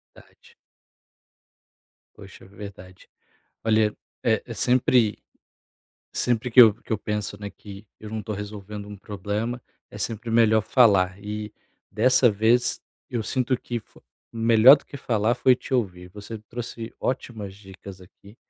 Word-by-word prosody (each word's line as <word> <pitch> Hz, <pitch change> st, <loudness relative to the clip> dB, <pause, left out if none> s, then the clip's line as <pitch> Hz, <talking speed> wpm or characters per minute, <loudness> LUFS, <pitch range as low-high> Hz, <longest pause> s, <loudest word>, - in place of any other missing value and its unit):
Verdade. 470 Hz, -, -20 dB, 1.6 s
Poxa, 100 Hz, -1 st, -13 dB
verdade. 95 Hz, -2 st, -12 dB, 0.5 s
Olha, 110 Hz, -1 st, +2 dB, 0.3 s
eh -, -, +1 dB
eh, -, -, -7 dB
sempre 125 Hz, -3 st, +2 dB, 0.9 s
sempre 120 Hz, 0 st, -1 dB
que 125 Hz, +2 st, +8 dB
eu 110 Hz, -4 st, +8 dB
que 120 Hz, -, -8 dB
eu 110 Hz, -, 0 dB
penso, 105 Hz, -1 st, -4 dB
né, 100 Hz, -, -5 dB
que 100 Hz, +1 st, -12 dB
eu 110 Hz, 0 st, -9 dB
não 110 Hz, -, -4 dB
estou 105 Hz, 0 st, -5 dB
resolvendo 105 Hz, 0 st, -7 dB
um 105 Hz, -, -8 dB
problema, 105 Hz, +5 st, -4 dB, 0.3 s
é -, -, -11 dB
sempre 115 Hz, +2 st, -4 dB
melhor 110 Hz, -1 st, +4 dB
falar 100 Hz, -8 st, +4 dB
e 105 Hz, 0 st, -5 dB, 0.4 s
dessa 130 Hz, -1 st, +4 dB
vez, 110 Hz, +4 st, +2 dB, 0.3 s
eu 120 Hz, -2 st, -2 dB
sinto 130 Hz, +3 st, 0 dB
que 120 Hz, -, -4 dB
fo -, -, -23 dB, 0.3 s
melhor 115 Hz, +3 st, +7 dB
do 140 Hz, -, -15 dB
que -, -, -10 dB
falar 115 Hz, -3 st, 0 dB
foi 125 Hz, +1 st, +4 dB
te 130 Hz, -, -11 dB
ouvir. 90 Hz, -8 st, -1 dB
Você 105 Hz, +2 st, -8 dB
trouxe 115 Hz, -1 st, -7 dB
ótimas 110 Hz, -6 st, -4 dB
dicas 95 Hz, -1 st, -12 dB
aqui. 100 Hz, +3 st, -17 dB
110 Hz, 145 wpm, -24 LUFS, 100-120 Hz, 1.6 s, que